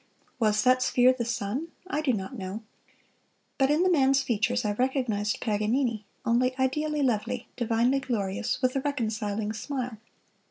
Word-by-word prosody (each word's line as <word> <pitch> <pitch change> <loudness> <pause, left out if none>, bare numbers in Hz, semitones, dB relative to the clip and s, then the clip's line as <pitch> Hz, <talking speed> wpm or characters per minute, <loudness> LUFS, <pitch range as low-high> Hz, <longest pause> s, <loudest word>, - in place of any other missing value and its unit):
Was 215 -2 +2
that 255 0 +4
sphere 255 0 +4
the 250 -2 -3
sun? 235 +6 -2 0.2
I 310 -5 -2
do 295 -4 +2
not 215 +3 -3
know. 195 +1 -6 1.0
But 270 0 +4
in 305 +4 +3
the 370 - +3
man's 270 -4 +4
features 235 0 0
I 210 - +1
recognized 235 -4 0
Paganini, 220 +1 0 0.2
only 255 +2 +2
ideally 295 +3 0
lovely, 245 0 -1
divinely 240 +3 +2
glorious, 220 -4 -2
with 255 +1 +2
a 270 - +1
reconciling 220 -6 -2
smile. 250 -1 -4
245 Hz, 150 wpm, -27 LUFS, 215-265 Hz, 1.0 s, that